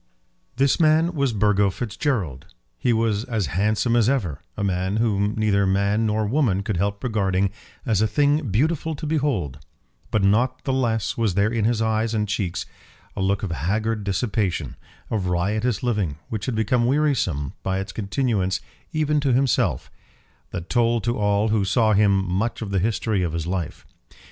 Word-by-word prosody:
This 135 +1 +2
man 160 +2 +4
was 140 -5 +1
Burgo 105 -1 +2
Fitzgerald. 100 - -3 0.3
He 125 - +1
was 110 -2 +1
as 110 -6 -1
handsome 110 +6 +1
as 120 -1 +4
ever; 100 - -1 0.2
a 105 - -2
man 95 +1 0
whom 105 -2 +1
neither 100 -2 +2
man 100 +3 +1
nor 110 0 0
woman 105 -5 +1
could 100 -2 -2
help 100 +2 -1
regarding 100 -5 +1 0.3
as 110 -3 +1
a 110 - +3
thing 145 +1 +1
beautiful 155 - 0
to 155 - -6
behold; 135 - -1 0.5
but 110 - +1
not 120 +6 +2
the 135 - -1
less 115 -5 0
was 110 -6 +1
there 105 +3 +2
in 110 -3 +1
his 115 -1 +1
eyes 110 0 0
and 105 -1 0
cheeks 95 -3 -2 0.5
a 100 - -3
look 100 +2 0
of 95 - -2
haggard 105 - -1
dissipation, 100 -2 -1 0.4
of 100 -5 -1
riotous 105 +6 0
living, 105 -11 0
which 110 +1 -4
had 125 - -1
become 120 +2 +1
wearisome, 125 - 0
by 95 0 -1
its 95 0 -4
continuance, 100 -3 -1 0.3
even 150 -1 +1
to 140 -3 +1
himself, 130 -1 +1 0.6
that 85 0 -6
told 120 -2 +1
to 120 +1 0
all 105 +1 +2
who 105 -2 +2
saw 110 +3 +2
him 100 -2 +3
much 105 +6 -1
of 100 - -6
the 100 - +1
history 110 0 0
of 85 -3 -1
his 85 -1 -2
life. 90 -2 -4
105 Hz, 175 wpm, -23 LUFS, 95-120 Hz, 0.6 s, man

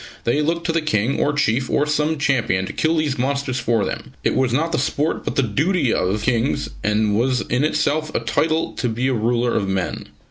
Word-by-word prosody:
They 130 +6 +1
looked 165 +3 -1
to 165 - +1
the 165 0 +1
King 120 -3 0
or 145 - +2
chief, 130 -3 0
or 145 - +2
some 150 +1 0
champion, 120 -9 +1
to - - -6
kill 160 +1 +1
these 150 -4 0
monsters 135 0 -1
for 115 -4 +1
them. - - -6
It - - +2
was 130 -2 +1
not 160 +7 0
the - - 0
sport 145 +3 -1
but - - -3
the 135 - +3
duty 140 - +1
of. 95 +3 0
Kings, 120 +2 0
and 105 0 +1
was 125 +2 +1
in 125 +3 -1
itself 155 0 0
a - - +2
title 160 0 0
to 125 - 0
be 120 +4 -1
a - - +1
ruler 120 +1 +1
of 100 - 0
men. 95 -3 -2
130 Hz, 220 wpm, -21 LUFS, 115-150 Hz, -, the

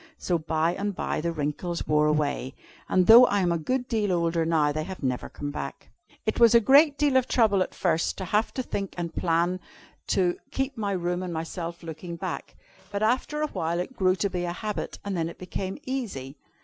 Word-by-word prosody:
So 175 -2 0
by 160 +1 0
and 200 +1 -3
by - - -2
the 170 +1 -1
wrinkles 165 +3 -3
wore 150 0 +3
away, 145 -3 0 0.3
and 185 -1 +3
though 235 +4 +9
I 205 -1 +1
am 175 -2 +2
a 170 - 0
good 250 +10 -1
deal 215 -4 0
older 170 -1 +1
now, 155 -3 +3
they 155 +1 -2
have 185 -1 -8
never 125 -2 -2
come 145 0 -5
back. 140 -1 -6 0.4
"It 220 - -1
was 235 -1 +7
a - - +9
great 285 +6 +5
deal 290 -3 +3
of 255 - +2
trouble 215 -5 +3
at - - -2
first 165 -2 0
to 190 - -4
have 210 +5 +1
to 255 - -1
think 200 -5 -4
and 170 -1 -3
plan 175 +2 +1 0.5
to 180 -2 +1
keep 270 0 -2
my 205 -3 -2
room 175 0 -1
and 180 -1 -4
myself 170 +1 -5
looking 170 +1 -7
nice. - - -3 0.5
But 200 +1 -2
after 260 +6 +1
a - - +1
while 165 +2 -2
it 220 +9 -4
grew 185 -4 +3
to 200 +1 -1
be 180 -1 -2
a 175 0 -2
habit, 210 +2 -4
and 200 -1 -2
then 165 -1 -1
it - - -11
became 185 +1 -5
easy. 200 - -4
180 Hz, 215 wpm, -26 LUFS, 165-215 Hz, 0.5 s, though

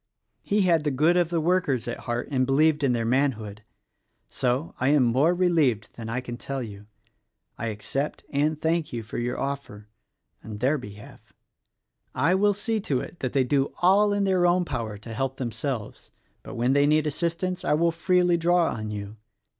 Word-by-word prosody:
He 205 +1 +1
had 170 -4 +3
the 150 - +1
good 155 +6 +3
of 175 -2 +2
the 170 -1 0
workers 155 -8 +1
at 120 - -4
heart 120 0 -3
and 130 -2 +1
believed 150 +2 +3
in 135 - +3
their 115 -2 0
manhood. 115 -5 0 0.7
So, 130 +5 -1
I 130 - +1
am 145 -1 +4
more 135 +9 +3
relieved 155 - +1
than 115 -1 -7
I 125 +3 -2
can 120 -1 -7
tell 135 0 -4
you. 105 -2 -10 0.7
I 115 - -4
accept 115 +7 -3
and 150 +2 0
thank 160 0 0
you 115 -2 -4
for 110 - -6
your 125 +1 -2
offer, 135 -7 -5 0.5
in 110 -1 -7
their 135 +7 +1
behalf. 105 -3 -13 0.8
I 155 +8 +2
will 205 +2 +3
see 220 +2 -2
to 140 -10 -1
it 175 - -8
that 130 - -3
they 135 - +3
do 135 +2 0
all 200 +3 +5
in 205 0 +1
their 185 -2 +3
own 175 +1 +2
power 115 -8 -4
to 115 +2 -9
help 135 +2 -2
themselves; 125 -2 -4 0.3
but - - -9
when 120 +3 +1
they 145 +1 +4
need 155 0 +3
assist 170 +3 -2
ance 185 0 -2
I - - +1
will 170 +2 +2
freely 180 +1 +2
draw 170 0 +2
on 110 -1 -5
you. 105 0 -6
140 Hz, 195 wpm, -25 LUFS, 120-170 Hz, 0.8 s, all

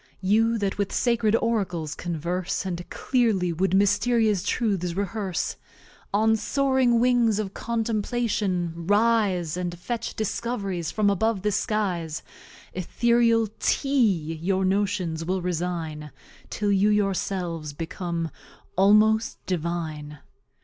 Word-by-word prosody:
You 225 +4 +3
that 200 -1 -2
with 200 -1 0
Sacred 230 -3 +2
Oracles 190 -10 -1
converse, 175 +3 -3
And 175 -2 -5
clearly 215 -9 +1
wou'd 190 +3 +1
Mysterious 205 +1 +3
Truths 190 -4 -1
rehearse; 200 -2 -2 0.5
On 220 +2 +3
soaring 260 +1 +2
Wings 240 -3 +3
of 205 -2 -3
Contemplation 215 -5 -1
rise, 205 -6 +2
And 175 -1 -3
fetch 230 +6 -4
Discov'ries 200 -5 -2
from 210 -2 +2
above 205 0 0
the 210 - +1
Skies; 185 -7 -1 0.5
Ethereal 230 +4 +2
TEA 200 - +1
your 190 +2 +1
Notions 190 -4 0
will 185 +1 -2
resine, 165 -3 -3 0.4
Till 205 -1 -1
you 200 +1 +3
yourselves 185 -6 -1
become 165 +1 -4 0.4
almost 215 +3 +4
Divine. 160 -4 -3
195 Hz, 110 wpm, -25 LUFS, 175-220 Hz, 0.5 s, almost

